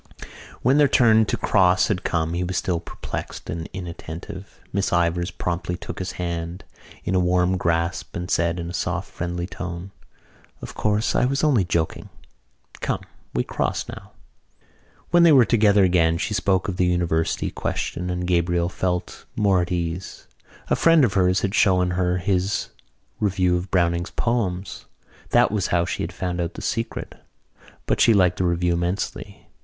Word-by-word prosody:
When 135 Hz, +4 st, +4 dB
their 145 Hz, -, +6 dB
turn 110 Hz, -4 st, +5 dB
to -, -, -1 dB
cross 90 Hz, -2 st, +3 dB
had 95 Hz, -3 st, -1 dB
come 80 Hz, -1 st, -1 dB
he 90 Hz, +1 st, -1 dB
was 90 Hz, 0 st, -2 dB
still 90 Hz, -3 st, 0 dB
perplexed 85 Hz, -, -7 dB
and 80 Hz, 0 st, -5 dB
inattentive. 90 Hz, +1 st, -8 dB
Miss 100 Hz, 0 st, 0 dB
Ivors 85 Hz, 0 st, +1 dB
promptly 90 Hz, 0 st, -3 dB
took -, -, -7 dB
his 95 Hz, -1 st, -4 dB
hand 85 Hz, +1 st, -4 dB, 0.4 s
in 95 Hz, -, -2 dB
a 95 Hz, -, +3 dB
warm 90 Hz, +1 st, +2 dB
grasp 85 Hz, -1 st, -1 dB
and 90 Hz, 0 st, -4 dB
said 85 Hz, +1 st, +1 dB
in 85 Hz, -, -4 dB
a 85 Hz, -, -6 dB
soft 90 Hz, +1 st, -3 dB
friendly 85 Hz, 0 st, -3 dB
tone: 90 Hz, 0 st, -6 dB, 0.7 s
"Of -, -, -8 dB
course, 105 Hz, +1 st, 0 dB
I -, -, +3 dB
was 135 Hz, +3 st, 0 dB
only 135 Hz, -10 st, +4 dB
joking. 85 Hz, -2 st, -2 dB, 0.7 s
Come, -, -, -2 dB, 0.3 s
we 60 Hz, -, +2 dB
cross -, -, -2 dB
now." -, -, -10 dB, 1.0 s
When 175 Hz, 0 st, +6 dB
they 170 Hz, -1 st, +7 dB
were 130 Hz, -5 st, +7 dB
together 105 Hz, -4 st, +4 dB
again 85 Hz, -3 st, +3 dB
she 105 Hz, +3 st, -2 dB
spoke 95 Hz, -2 st, +1 dB
of 95 Hz, -3 st, -3 dB
the 90 Hz, -, +2 dB
University 85 Hz, -2 st, 0 dB
question 90 Hz, +1 st, -3 dB
and 90 Hz, 0 st, -2 dB
Gabriel 85 Hz, 0 st, +1 dB
felt 90 Hz, -1 st, -3 dB
more 100 Hz, -4 st, +3 dB
at 85 Hz, +1 st, -4 dB
ease. 85 Hz, 0 st, -4 dB, 0.4 s
A -, -, +3 dB
friend 165 Hz, -4 st, +5 dB
of 105 Hz, -, -1 dB
hers 90 Hz, -1 st, +3 dB
had 100 Hz, 0 st, -1 dB
shown 90 Hz, -5 st, +3 dB
her 90 Hz, 0 st, +1 dB
his 95 Hz, +1 st, 0 dB, 0.5 s
review 95 Hz, -3 st, +2 dB
of 90 Hz, +2 st, -3 dB
Browning's 85 Hz, -1 st, +1 dB
poems. 100 Hz, -6 st, -2 dB, 0.4 s
That -, -, +4 dB
was 105 Hz, -3 st, 0 dB
how 85 Hz, -1 st, +1 dB
she -, -, -3 dB
had -, -, -3 dB
found 90 Hz, -2 st, -3 dB
out 85 Hz, -1 st, -3 dB
the -, -, -7 dB
secret: 115 Hz, 0 st, -4 dB, 0.6 s
but -, -, 0 dB
she 115 Hz, -, +6 dB
liked 90 Hz, -2 st, +3 dB
the 90 Hz, -, +1 dB
review 85 Hz, 0 st, +1 dB
immensely. 90 Hz, +3 st, -3 dB
90 Hz, 170 wpm, -23 LUFS, 85-100 Hz, 1.0 s, they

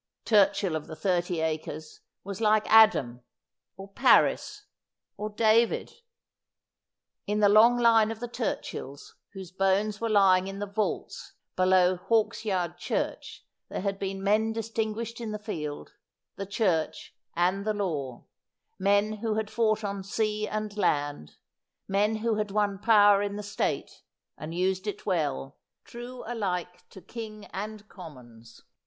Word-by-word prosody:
Turchill 200 Hz, -4 st, +3 dB
of 155 Hz, -, -5 dB
the 160 Hz, -, -8 dB
thirty 175 Hz, -2 st, -1 dB
acres 155 Hz, -1 st, -4 dB, 0.2 s
was 200 Hz, +2 st, -7 dB
like 215 Hz, -1 st, +3 dB
Adam, 170 Hz, -, +5 dB, 0.6 s
or 195 Hz, 0 st, -9 dB
Paris, 415 Hz, -, +3 dB, 0.5 s
or 210 Hz, +1 st, -4 dB
David. 220 Hz, +2 st, +2 dB, 1.3 s
In 210 Hz, +1 st, 0 dB
the 205 Hz, -, +5 dB
long 220 Hz, +4 st, +6 dB
line 225 Hz, -2 st, +4 dB
of 225 Hz, -1 st, -5 dB
the 240 Hz, -, -4 dB
Turchills 220 Hz, -, -5 dB, 0.2 s
whose 190 Hz, -3 st, -9 dB
bones 195 Hz, +3 st, 0 dB
were 230 Hz, -, -1 dB
lying 190 Hz, -3 st, +4 dB
in 195 Hz, 0 st, -6 dB
the 205 Hz, -, -3 dB
vaults 205 Hz, +1 st, -4 dB, 0.2 s
below 185 Hz, 0 st, +4 dB
Hawksyard 185 Hz, -4 st, -1 dB
Church -, -, -4 dB, 0.2 s
there -, -, -4 dB
had 195 Hz, 0 st, -2 dB
been 195 Hz, 0 st, -4 dB
men 215 Hz, +2 st, +2 dB
distinguished 225 Hz, +1 st, -4 dB
in 220 Hz, -2 st, -4 dB
the -, -, -3 dB
field, 160 Hz, -9 st, -6 dB, 0.4 s
the 195 Hz, -, -6 dB
Church, 185 Hz, -6 st, -1 dB, 0.2 s
and 180 Hz, +3 st, +1 dB
the 215 Hz, 0 st, -1 dB
law; 145 Hz, -11 st, -4 dB, 0.5 s
men 205 Hz, +2 st, +2 dB
who 220 Hz, 0 st, -2 dB
had 220 Hz, -1 st, -3 dB
fought 220 Hz, -2 st, +1 dB
on 200 Hz, -1 st, -4 dB
sea 215 Hz, +1 st, -1 dB
and 215 Hz, -1 st, -4 dB
land; 145 Hz, -, -1 dB, 0.5 s
men 205 Hz, +3 st, +1 dB
who 225 Hz, -2 st, +1 dB
had 210 Hz, -1 st, -2 dB
won 200 Hz, -1 st, 0 dB
power 205 Hz, -2 st, +5 dB
in 205 Hz, 0 st, -3 dB
the 210 Hz, -, -5 dB
State, 205 Hz, -, -3 dB, 0.3 s
and 160 Hz, +2 st, -7 dB
used 190 Hz, +2 st, -1 dB
it 205 Hz, -, -5 dB
well, 145 Hz, -7 st, -2 dB, 0.2 s
true 245 Hz, +1 st, -9 dB
alike 180 Hz, -6 st, -4 dB
to 190 Hz, -, -14 dB
king 215 Hz, -3 st, -8 dB
and 215 Hz, +1 st, -6 dB
commons. 120 Hz, -, -13 dB
200 Hz, 140 wpm, -27 LUFS, 180-215 Hz, 1.3 s, long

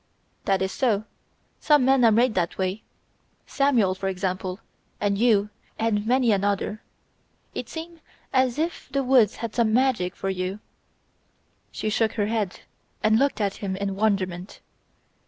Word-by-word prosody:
"That 195 Hz, -1 st, +2 dB
is 190 Hz, -, -2 dB
so, 225 Hz, -6 st, +1 dB, 0.6 s
some 295 Hz, -4 st, +4 dB
men 265 Hz, -1 st, +4 dB
are 230 Hz, -, +6 dB
made 235 Hz, +2 st, +3 dB
that 180 Hz, -3 st, -1 dB
way. 190 Hz, +3 st, -2 dB, 0.6 s
Samuel, 250 Hz, -9 st, +2 dB
for 195 Hz, +1 st, -4 dB
example, 185 Hz, 0 st, -3 dB, 0.4 s
and 200 Hz, -1 st, +1 dB
you, 210 Hz, -2 st, +3 dB, 0.3 s
and 220 Hz, -1 st, 0 dB
many 250 Hz, -1 st, +3 dB
another. 205 Hz, +1 st, 0 dB, 0.7 s
It -, -, -5 dB
seems 330 Hz, +1 st, -8 dB, 0.3 s
as 260 Hz, -1 st, +2 dB
if 330 Hz, +3 st, -3 dB
the 275 Hz, -1 st, 0 dB
woods 250 Hz, -5 st, +4 dB
had 225 Hz, -, -6 dB
some 230 Hz, -3 st, +2 dB
magic 235 Hz, -8 st, +1 dB
for 195 Hz, -, -2 dB
you 185 Hz, +2 st, -3 dB, 0.6 s
..." -, -, -43 dB, 0.3 s
She 215 Hz, -, -3 dB
shook 220 Hz, 0 st, +1 dB
her 205 Hz, -, 0 dB
head 210 Hz, -3 st, -2 dB, 0.4 s
and 220 Hz, +1 st, +4 dB
looked 280 Hz, -3 st, +1 dB
at 200 Hz, -2 st, -1 dB
him 195 Hz, -2 st, -3 dB
in 195 Hz, 0 st, -3 dB
wonderment. 195 Hz, -3 st, -1 dB
215 Hz, 155 wpm, -25 LUFS, 195-245 Hz, 0.7 s, are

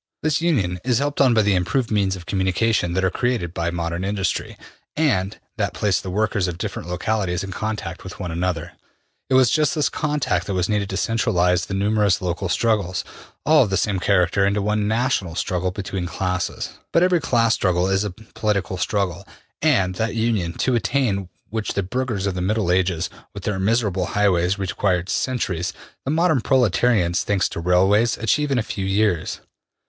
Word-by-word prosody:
This 155 Hz, 0 st, +1 dB
union 105 Hz, -, +1 dB
is 125 Hz, -2 st, +2 dB
helped 145 Hz, +1 st, 0 dB
on 130 Hz, -4 st, +5 dB
by 110 Hz, -, +4 dB
the 100 Hz, -1 st, +3 dB
im 90 Hz, -1 st, +2 dB
proved 115 Hz, +7 st, -1 dB
means 100 Hz, -3 st, +1 dB
of 90 Hz, -2 st, -10 dB
communication 95 Hz, 0 st, +1 dB
that 95 Hz, +1 st, +1 dB
are 95 Hz, -, +1 dB
created 120 Hz, -9 st, -1 dB
by 85 Hz, -1 st, -1 dB
modern 85 Hz, +1 st, -3 dB
industry, 95 Hz, -2 st, -2 dB, 0.4 s
and 105 Hz, -12 st, +1 dB, 0.2 s
that -, -, -1 dB
place 100 Hz, -4 st, +1 dB
the 95 Hz, -, -6 dB
workers 105 Hz, 0 st, 0 dB
of 85 Hz, -1 st, -4 dB
different 85 Hz, -, -5 dB
localities 95 Hz, -1 st, -1 dB
in 95 Hz, -, -6 dB
contact 105 Hz, -4 st, -4 dB
with 95 Hz, -, -9 dB
one 90 Hz, -3 st, -4 dB
another. 85 Hz, 0 st, -2 dB, 0.6 s
It 130 Hz, -, +3 dB
was 130 Hz, -2 st, +5 dB
just 150 Hz, -2 st, +2 dB
this 145 Hz, -5 st, +1 dB
contact 145 Hz, -, -1 dB
that 100 Hz, -, -2 dB
was 90 Hz, -1 st, +1 dB
needed 105 Hz, -2 st, 0 dB
to 95 Hz, -, -3 dB
centralize 90 Hz, -2 st, +1 dB
the 100 Hz, -, -3 dB
numerous 105 Hz, -1 st, +2 dB
local 90 Hz, +1 st, -2 dB
struggles, 100 Hz, -4 st, +1 dB, 0.4 s
all 155 Hz, 0 st, +6 dB
of -, -, -5 dB
the 95 Hz, -, +1 dB
same 100 Hz, -3 st, 0 dB
character, 90 Hz, 0 st, +2 dB
into 100 Hz, +1 st, +2 dB
one 105 Hz, +1 st, 0 dB
national 110 Hz, -7 st, 0 dB
struggle 90 Hz, +1 st, -1 dB
between 95 Hz, -1 st, -4 dB
classes. 90 Hz, 0 st, -3 dB
But 170 Hz, -, +4 dB
every 180 Hz, -2 st, +3 dB
class 115 Hz, -5 st, +2 dB
struggle 90 Hz, -1 st, +1 dB
is 95 Hz, +1 st, +1 dB
a 105 Hz, -, -2 dB
political 105 Hz, -2 st, -3 dB
struggle. 100 Hz, -1 st, -1 dB, 0.3 s
And 95 Hz, -1 st, +3 dB
that 115 Hz, +1 st, -1 dB
union, 110 Hz, -7 st, 0 dB
to 130 Hz, -, +2 dB
attain 110 Hz, -5 st, 0 dB, 0.2 s
which 110 Hz, -1 st, -2 dB
the 100 Hz, -, 0 dB
burghers 115 Hz, -1 st, -2 dB
of 100 Hz, -, 0 dB
the 90 Hz, -, -3 dB
Middle 100 Hz, -1 st, +1 dB
Ages, 90 Hz, -2 st, +1 dB, 0.3 s
with 100 Hz, -, -7 dB
their 100 Hz, -2 st, -1 dB
miserable 100 Hz, -3 st, +1 dB
highways, 95 Hz, -2 st, +2 dB
required 95 Hz, -1 st, -1 dB
centuries, 100 Hz, -10 st, -1 dB, 0.3 s
the -, -, -2 dB
modern 160 Hz, -3 st, +2 dB
proletarians, 110 Hz, -7 st, +2 dB
thanks 100 Hz, -2 st, +1 dB
to -, -, -5 dB
railways, 95 Hz, +6 st, +3 dB
achieve 145 Hz, +7 st, +1 dB
in 135 Hz, -, +1 dB
a 115 Hz, -, +1 dB
few 100 Hz, -3 st, -4 dB
years. 95 Hz, -3 st, 0 dB
100 Hz, 185 wpm, -22 LUFS, 90-115 Hz, 0.6 s, all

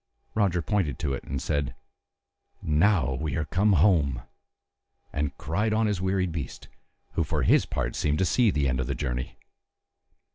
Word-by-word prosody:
Roger 95 Hz, -5 st, +1 dB
pointed 95 Hz, -, 0 dB
to 70 Hz, -3 st, -2 dB
it, 70 Hz, -, -4 dB
and 70 Hz, 0 st, -3 dB
said, 70 Hz, 0 st, -2 dB, 0.9 s
"Now 80 Hz, -3 st, +3 dB
we 70 Hz, +1 st, -3 dB
are 80 Hz, -, -1 dB
come 100 Hz, +7 st, +2 dB
home," 75 Hz, -8 st, +3 dB, 0.9 s
and 70 Hz, 0 st, -2 dB
cried 105 Hz, +9 st, -1 dB
on 110 Hz, +1 st, +2 dB
his 105 Hz, -4 st, 0 dB
wearied 95 Hz, -1 st, 0 dB
beast, 80 Hz, -3 st, -6 dB, 0.4 s
who -, -, 0 dB
for -, -, -1 dB
his -, -, +4 dB
part 65 Hz, 0 st, -2 dB
seemed 75 Hz, 0 st, 0 dB
to 95 Hz, -, +2 dB
see 115 Hz, +5 st, +3 dB
the 75 Hz, -6 st, +1 dB
end 65 Hz, 0 st, 0 dB
of 65 Hz, -, -1 dB
his 70 Hz, -, -2 dB
journey. 60 Hz, 0 st, -3 dB
80 Hz, 170 wpm, -27 LUFS, 70-95 Hz, 0.9 s, his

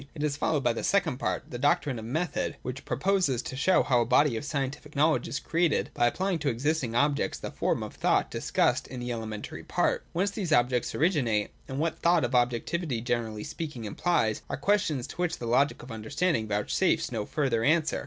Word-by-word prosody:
It 150 Hz, -, -4 dB
is 150 Hz, -2 st, 0 dB
followed 150 Hz, -1 st, 0 dB
by 120 Hz, -, +3 dB
the -, -, -4 dB
second 170 Hz, -10 st, +1 dB
part, -, -, -2 dB
the 120 Hz, -, -5 dB
doctrine 140 Hz, -2 st, +1 dB
of 110 Hz, -, -7 dB
Method, 155 Hz, +7 st, -2 dB
which 130 Hz, +2 st, -6 dB
proposes 140 Hz, -2 st, +1 dB
to -, -, -6 dB
show 185 Hz, +8 st, +3 dB
how 125 Hz, -4 st, +3 dB
a -, -, +4 dB
body 135 Hz, +2 st, +4 dB
of 110 Hz, -, -3 dB
scientific 145 Hz, 0 st, -4 dB
knowledge 155 Hz, +3 st, +2 dB
is -, -, -3 dB
created 170 Hz, -2 st, 0 dB
by 120 Hz, -, +3 dB
applying 185 Hz, +6 st, 0 dB
to 145 Hz, -1 st, 0 dB
existing 130 Hz, 0 st, -1 dB
objects 140 Hz, -4 st, +1 dB
the -, -, -6 dB
forms -, -, -1 dB
of -, -, -7 dB
thought -, -, +1 dB
discussed -, -, +1 dB
in 125 Hz, 0 st, -7 dB
the 120 Hz, 0 st, -4 dB
elementary 110 Hz, -2 st, -5 dB
part. -, -, 0 dB
Whence 195 Hz, +4 st, 0 dB
these 195 Hz, -5 st, -3 dB
objects 125 Hz, -3 st, +2 dB
originate, 130 Hz, -, +1 dB, 0.2 s
and 135 Hz, -, -5 dB
what 160 Hz, +3 st, -1 dB
the -, -, -27 dB
thought 170 Hz, -2 st, +4 dB
of 120 Hz, -, -4 dB
objectivity 125 Hz, +4 st, 0 dB
generally 115 Hz, -3 st, -2 dB
speaking 150 Hz, -9 st, -6 dB
implies, 110 Hz, -, 0 dB
are -, -, -2 dB
questions 155 Hz, -6 st, +1 dB
to -, -, -10 dB
which 175 Hz, -1 st, -1 dB
the 120 Hz, -, -6 dB
Logic 130 Hz, +5 st, +2 dB
of 125 Hz, -, -10 dB
Understanding 115 Hz, +3 st, -1 dB
vouchsafes 125 Hz, -, +1 dB
no 110 Hz, -4 st, -3 dB
further 130 Hz, -7 st, 0 dB
answer. 155 Hz, +3 st, +2 dB
140 Hz, 205 wpm, -28 LUFS, 120-160 Hz, 0.2 s, a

